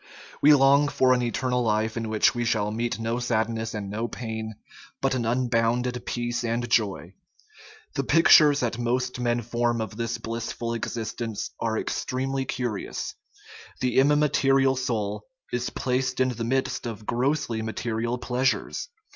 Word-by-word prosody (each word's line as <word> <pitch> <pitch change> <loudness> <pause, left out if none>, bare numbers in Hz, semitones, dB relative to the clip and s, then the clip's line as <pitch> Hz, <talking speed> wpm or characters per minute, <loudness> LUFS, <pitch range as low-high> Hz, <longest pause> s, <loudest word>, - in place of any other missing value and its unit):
We 150 - +7
long 140 +1 +5
for 130 -3 +3
an 125 - +1
eternal 125 +1 0
life 110 -1 0
in 115 -1 -3
which 110 -1 +3
we 120 - -2
shall 105 -3 0
meet 120 +2 -2
no 115 +1 -2
sadness 115 -2 -1
and 105 -2 -4
no 110 +4 -3
pain, 110 -2 -5 0.4
but 135 0 +1
an 120 -3 -1
unbounded 120 0 +1
peace 120 0 -2
and 120 +1 -1
joy. 95 -6 0 0.8
The 140 - -1
pictures 150 -1 +6
that 120 -1 -1
most 125 +1 -1
men 120 -1 0
form 120 +1 0
of 110 -1 -4
this 115 0 -2
blissful 115 +1 -4
exist 115 0 -4
ence 115 -3 -3
are 110 -1 -1
extremely 135 +3 -2
curious; 120 -5 -3 0.7
the 125 0 +2
immaterial 135 -2 +3
soul 110 -6 -2 0.3
is 125 0 -1
placed 125 0 -1
in 130 0 +3
the 120 -2 -3
midst 130 0 -1
of 110 -2 -7
grossly 125 -1 0
material 115 +2 -2
pleasures. 125 - -1
120 Hz, 150 wpm, -26 LUFS, 115-130 Hz, 0.8 s, We